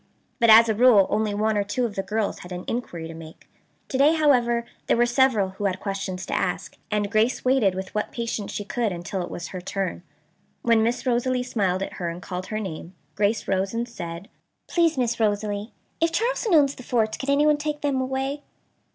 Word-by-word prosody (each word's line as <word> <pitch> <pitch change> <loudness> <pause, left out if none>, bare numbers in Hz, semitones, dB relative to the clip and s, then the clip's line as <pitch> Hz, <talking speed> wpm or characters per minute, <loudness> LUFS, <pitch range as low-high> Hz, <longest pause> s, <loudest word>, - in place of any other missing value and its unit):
But 230 - +4
as 225 +1 +9
a 220 - +2
rule 220 -3 +6
only 210 -1 0
one 215 +1 +1
or - - +1
two 205 +5 -1
of 225 - -3
the 195 - -2
girls 210 +2 -2
had 180 - -11
any 180 0 -5
inquiry 175 -9 -4
to 165 - -8
make. 160 0 -12 0.4
To 265 - -2
day, 300 +4 +5
however, 240 -6 +3 0.2
there - - +3
were 240 - +4
several 240 -5 +3
who 195 +2 -5
had 190 -1 0
questions 195 -2 -4
to - - -5
ask - - -2
and 205 -1 -1
Grace 225 +5 +1
waited 250 -8 +3
with 190 0 -6
what 210 - -2
patience 230 -3 -3
she 205 - -4
could 230 0 -1
until 175 +2 -4
it 175 - -5
was 175 - -6
her 185 - -6
turn. 190 -1 -3 0.6
When 230 -2 +4
Miss 235 +4 0
Rosalie 250 0 +1
smiled 195 -6 0
at - - -6
her 170 - -1
and 170 +1 -6
called 180 +1 -6
her 215 - -3
name, 180 -2 -7 0.2
Grace 205 +6 0
rose 190 +2 0
and 235 +1 -1
said: 170 -5 -7 0.4
"Please, 335 -3 +2
Miss 240 -2 0
Rosalie, 205 0 -1 0.3
if 330 0 +3
Charleston 450 0 +1
owns 280 -3 +5
the - - -11
forts, 225 -3 0
could 270 - -4
anyone 295 +1 +4
take 295 0 -3
them 275 -3 0
away?" 265 +2 -2
220 Hz, 210 wpm, -24 LUFS, 195-255 Hz, 0.6 s, as